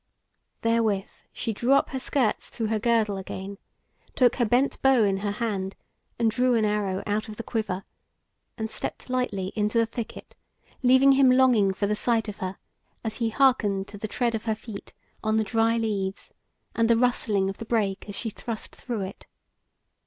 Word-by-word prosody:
Therewith 225 -4 +1 0.2
she 225 - -3
drew 240 +6 +2
up 275 - +3
her 265 - -2
skirts 255 -4 0
through 225 - -3
her 220 -1 +1
girdle 220 -3 +2
again, 190 +1 -6 0.6
took 250 -2 +4
her 240 - +3
bent 245 +5 +1
bow 265 -4 +5
in 195 -2 +2
her 200 +1 -2
hand, 205 -4 -2 0.4
and 230 -2 +2
drew 250 +1 +2
an 220 -2 +2
arrow 205 -2 -1
out 210 +1 -1
of 215 - -7
the 230 - -6
quiver, 215 -6 -2 0.7
and 220 - -2
stepped 235 - -5
lightly 205 -7 -1
into 210 +2 0
the 230 - +4
thicket, 230 0 -7 0.5
leaving 260 +2 +6
him 270 -1 +6
longing 250 -6 +5
for 195 +2 -1
the 205 - +1
sight 225 0 +1
of 210 -1 -6
her, 185 -1 -4 0.5
as 220 -2 -3
he 230 -2 0
hearkened 220 -6 +2
to 205 - -9
the 215 - -3
tread 235 +2 0
of 220 0 -3
her 220 -1 +1
feet 215 -2 -9 0.3
on 215 0 +2
the 220 - +3
dry 225 +2 +2
leaves, 200 -4 -2 0.4
and 230 0 +2
the 230 - +5
rustling 220 -5 +2
of 195 - -5
the - - -4
brake 210 -3 -1
as 200 - -6
she 225 +2 -4
thrust 225 +1 -6
through 235 -5 -4
it. 190 0 -7
220 Hz, 190 wpm, -26 LUFS, 205-240 Hz, 0.7 s, leaving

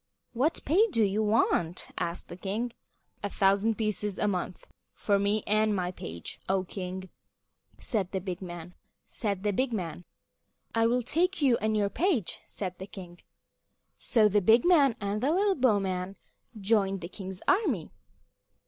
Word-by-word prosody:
"What 275 +7 +1
pay 380 +10 +4
do 230 - +2
you 205 +1 +1
want?" 210 -5 +1
asked 170 +1 -3
the - - -8
king. 210 +6 -3 0.5
"A 205 - -2
thousand 200 +3 +2
pieces 210 -2 -2
a 210 - +1
month 185 -2 -3 0.3
for 200 -1 +1
me 205 +1 +1
and 215 0 +2
my 180 -2 -1
page, 85 - -7
O 190 -1 +2
King," 185 0 -6 0.7
said 200 -6 -2
the 190 - -1
big 185 -1 -5
man. 175 -1 -8 2.0
"I 225 0 +3
will 245 +1 +1
take 340 +6 +1
you 255 -4 +5
and 215 0 0
your 200 -1 +1
page," 320 - 0
said 185 -3 -5
the 190 - -6
king. 175 -3 -10 0.8
So 220 -4 +4
the 205 0 +3
big 225 +5 +5
man 290 -9 +5
and 200 +1 -2
the 265 - +2
little 395 +3 +3
bowman 195 - +1 0.4
joined 195 -2 +2
the 170 - -5
king's 190 0 -8
army. 325 - +1
205 Hz, 150 wpm, -29 LUFS, 185-230 Hz, 2.0 s, you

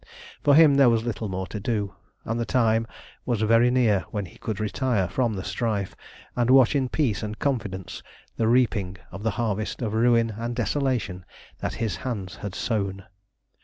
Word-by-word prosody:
For 145 - +5
him 150 -3 +7
there 135 -3 +7
was 115 -1 +2
little 115 -2 -3
more 95 0 -3
to 105 - -6
do, 100 -2 -2 0.3
and 115 +1 -2
the - - +1
time 115 -2 +2 0.4
was 120 -4 -1
very 115 +2 +5
near 120 -6 +3
when 105 -2 -3
he 85 - -15
could 110 -2 -4
retire 110 -2 0
from 115 +3 0
the 95 - -4
strife, 105 -5 -2 0.4
and 120 -1 +1
watch 130 +1 +6
in 130 -3 +1
peace 125 -9 0
and 105 0 -5
confidence 110 -9 -3 0.3
the 110 - +1
reaping 110 -6 +2
of 95 - -8
the 115 - 0
harvest 110 -3 -2
of 110 -2 -2
ruin 115 0 +3
and 115 +2 -4
desolation 120 -6 -1 0.4
that - - -3
his 115 -2 -2
hands 100 -8 -5
had 100 -3 -6
sown. 100 -4 -2
115 Hz, 180 wpm, -25 LUFS, 100-125 Hz, 0.4 s, him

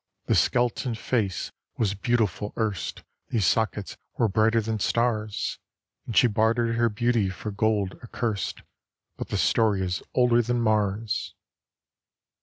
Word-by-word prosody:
"This - - +4
skeleton 120 0 +1
face 110 -5 -1 0.3
was 105 -4 +1
beautiful 105 -1 0
erst; 105 -6 -2 0.3
These 110 -5 +1
sockets 105 0 0 0.2
were 115 - +3
brighter 110 +3 +3
than 110 0 -2
stars; 110 -1 0 0.5
And 115 - -3
she - - +7
bartered 115 +1 +2
her 120 0 +3
beauty 115 -2 +1
for 100 +3 -5
gold 105 -2 0
accurst 115 -3 -3 0.5
But - - -6
the 105 - -2
story 100 +2 +2
is 90 -1 -2
older 120 -1 +4
than 120 +1 0
Mars!" 110 -1 0
110 Hz, 130 wpm, -26 LUFS, 105-120 Hz, 0.5 s, she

